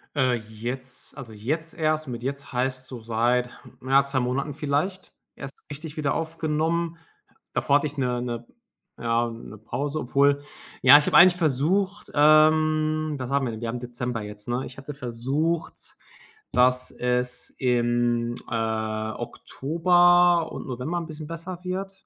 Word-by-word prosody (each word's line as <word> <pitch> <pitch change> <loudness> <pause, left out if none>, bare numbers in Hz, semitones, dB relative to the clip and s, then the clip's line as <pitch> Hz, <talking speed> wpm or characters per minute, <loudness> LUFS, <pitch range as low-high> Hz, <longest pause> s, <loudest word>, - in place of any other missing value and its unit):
Äh, 130 -3 +3
jetzt 125 +5 -7
also, 120 -5 -9
jetzt 155 +10 -3
erst. 155 -1 0
Mit 120 -1 -6
„jetzt“ 140 0 -5
heißt 130 +1 -1
so 125 -3 -8
seit, 120 +2 +1
hm, - - -17
ja, 135 +1 +5
2 140 -1 -1
Monaten 135 +4 -1
vielleicht 150 +7 -2 0.2
erst 135 0 -10
richtig 150 +1 -8
wieder 145 -2 0
aufgenommen. 165 +1 -1 0.6
Davor 140 - +3
hatte 150 - -1
ich 145 0 -10
'ne 125 -2 0
'ne 120 -1 -4 0.5
ja, 115 0 +1
'ne 115 -1 -10
Pause. 140 +7 -3
Obwohl, 140 +2 +2 0.4
ja, 135 +3 +10
ich 150 - +2
habe - - +4
eigentlich 175 0 +8
versucht 185 +7 0
ähm, 155 0 +4
was 125 0 -4
haben 140 -1 +1
wir 120 - -2
denn? 110 +1 -7
Wir 115 - -3
haben 120 +2 -3
Dezember 120 -1 -4
jetzt, 105 +1 -9
ne? 125 +2 -1
Ich 130 - -10
hatte 140 +2 -7
versucht, 140 +6 -3 0.6
dass 125 0 +3
es 125 0 -2
im, 120 -1 +1
äh, 110 -1 -2
Oktober 175 +5 +3
und - - -7
November 130 +7 -3
'n 170 - -6
bisschen 155 -1 -8
besser 170 +2 -6
wird. 195 +1 -5
135 Hz, 155 wpm, -25 LUFS, 120-155 Hz, 0.6 s, ja